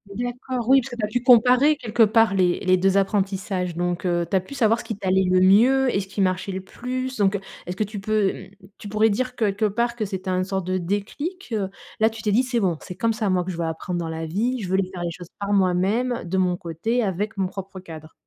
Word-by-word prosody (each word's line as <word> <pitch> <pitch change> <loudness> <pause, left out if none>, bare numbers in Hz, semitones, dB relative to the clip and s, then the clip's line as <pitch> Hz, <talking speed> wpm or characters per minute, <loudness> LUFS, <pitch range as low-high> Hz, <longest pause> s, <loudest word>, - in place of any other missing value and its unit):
D'accord, 245 0 -4
oui, 270 0 +6
parce - - -8
que - - -5
tu 230 - -5
as - - -4
dû 240 +3 -1
comparer 250 +5 +6
quelque 230 -2 -1
part 220 -1 +5
les 180 -2 +2
les 185 -1 +4
2 195 +1 +2
apprentissages 195 -3 -1
donc, 175 +1 -2
heu, 175 -1 +1
tu - - 0
as - - +5
pu 235 +10 -10
savoir 230 -2 +3
ce - - -7
qui 220 - -5
t'allait 190 -1 +2
le 185 0 +4
mieux 245 +7 +5
et - - +2
ce 190 - -5
qui 195 +1 -3
marchait 185 +1 0
le 190 0 -4
plus. 255 +5 -5
Donc, 200 -1 +2
heu, - - -1 0.3
est-ce 180 - -4
que 215 - +1
tu 205 0 -6
peux, 210 -1 +1
mmh, - - -17 0.3
tu 210 - -8
pourrais 215 +1 +3
dire 255 +4 -2
quelque 210 -1 +1
part 235 +3 -1
que 220 - -2
c'est 190 -1 -6
un 185 0 +1
sorte 190 -1 -3
de 185 0 -1
déclic, 235 - -4
heu? 195 -3 -1 0.3
Là, 220 +1 +4
tu 225 +1 -10
t'es 210 - +1
dit: 235 +5 +4
«C'est 245 -2 -1
bon, 180 -6 0
c'est 180 - -8
comme 230 -1 0
ça 215 -3 -1
moi 180 -1 +2
que 185 - -4
je 170 - -7
veux 170 - -1
apprendre 175 +2 -3
dans 165 -1 -3
la 160 0 -4
vie. 235 +10 -1
Je 185 - -4
voulais 190 0 +1
faire 175 -2 -6
les 170 - -2
choses 175 +1 -10
par 200 0 -1
moi-même, 200 +6 +1
de 190 +2 -2
mon 180 -1 +1
côté, 220 +9 -2
avec 205 +2 -2
mon 190 -1 +1
propre 195 0 -8
cadre.» 160 -3 -11
200 Hz, 265 wpm, -23 LUFS, 185-230 Hz, 0.3 s, oui